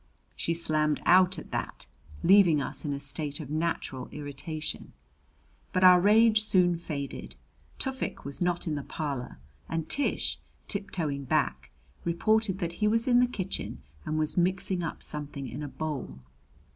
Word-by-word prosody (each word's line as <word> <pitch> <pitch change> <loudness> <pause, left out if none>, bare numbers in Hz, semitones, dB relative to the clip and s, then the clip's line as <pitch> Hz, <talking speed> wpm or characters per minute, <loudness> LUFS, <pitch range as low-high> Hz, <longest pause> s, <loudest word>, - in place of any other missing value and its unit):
She 165 - -1
slammed 155 -2 +1
out 185 0 +5
at - - -9
that, - - -4 0.4
leaving 180 -5 +6
us 140 - -3
in 145 - -1
a 140 - -2
state 145 +1 -3
of 150 -3 -7
natural 155 -5 -2
irritation. 150 +2 -5 0.8
But 185 - +2
our 180 -1 +8
rage 215 +2 +5
soon 180 -4 +4
faded. 150 -4 -6 0.4
Tufik 265 -1 -4
was 140 +4 -6
not 175 -1 0
in 160 - -1
the 145 - -2
parlor; 135 - -5 0.3
and 165 -1 -2
Tish, 285 - +1 0.3
tiptoeing 160 -9 -3
back, - - 0 0.3
reported 205 +3 +1
that 170 -3 -3
he 210 - +4
was 230 +3 +3
in 245 -1 +5
the 250 - +4
kitchen 190 - -5 0.2
and 155 - -2
was 155 +2 -1
mixing 185 +1 +1
up 165 - -5
something 145 -2 -4
in - - -6
a 145 - -4
bowl. 140 - -5
165 Hz, 155 wpm, -28 LUFS, 145-190 Hz, 0.8 s, our